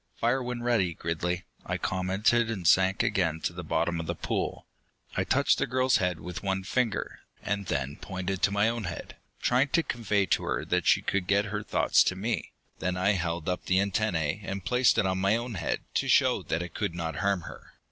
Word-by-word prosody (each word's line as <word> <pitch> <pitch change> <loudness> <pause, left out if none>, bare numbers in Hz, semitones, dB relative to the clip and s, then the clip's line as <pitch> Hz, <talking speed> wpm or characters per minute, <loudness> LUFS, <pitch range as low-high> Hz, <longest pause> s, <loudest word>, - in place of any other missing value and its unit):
"Fire 120 +3 +1
when 125 -1 -4
ready, 105 -9 +1
Gridley," 85 +3 -2 0.2
I - - -2
commented, 100 +5 +1
and 95 -7 -2
sank 95 +2 +4
again 80 -4 +1
to 85 - -2
the 90 +1 -6
bottom 85 +1 0
of 80 - -5
the - - -2
pool. - - -3 0.5
I - - +1
touched - - +2
the - - +1
girl's 130 +1 +3
head 90 -5 -1
with 90 -1 -6
one 95 -1 -1
finger, 115 +2 -1 0.2
and 100 -2 -2
then 70 0 -2
pointed 95 -1 -4
to 100 - +3
my 100 +2 +3
own 115 -2 -2
head, - - -7 0.3
trying 125 +3 +3
to 165 +4 +2
convey 105 -6 0
to - - +1
her - - -2
that - - 0
she - - +4
could 95 -2 -1
get 100 +1 +3
her 105 - -1
thoughts - - +3
to 95 - +1
me. 110 +5 -2 0.3
Then 90 +2 -1
I 95 +3 +3
held 85 -4 -2
up 90 -1 -2
the 95 0 +3
antennae 100 -3 0
and 95 -1 -5
placed 125 +4 +3
it 105 - +3
on 95 0 0
my 100 +3 +3
own 120 +1 -3
head 85 -5 -2
to - - 0
show - - +4
that 80 +2 -2
it 90 - -8
could 100 -5 -2
not 80 -2 -3
harm 100 -3 +1
her. - - -11
95 Hz, 215 wpm, -28 LUFS, 90-110 Hz, 0.5 s, sank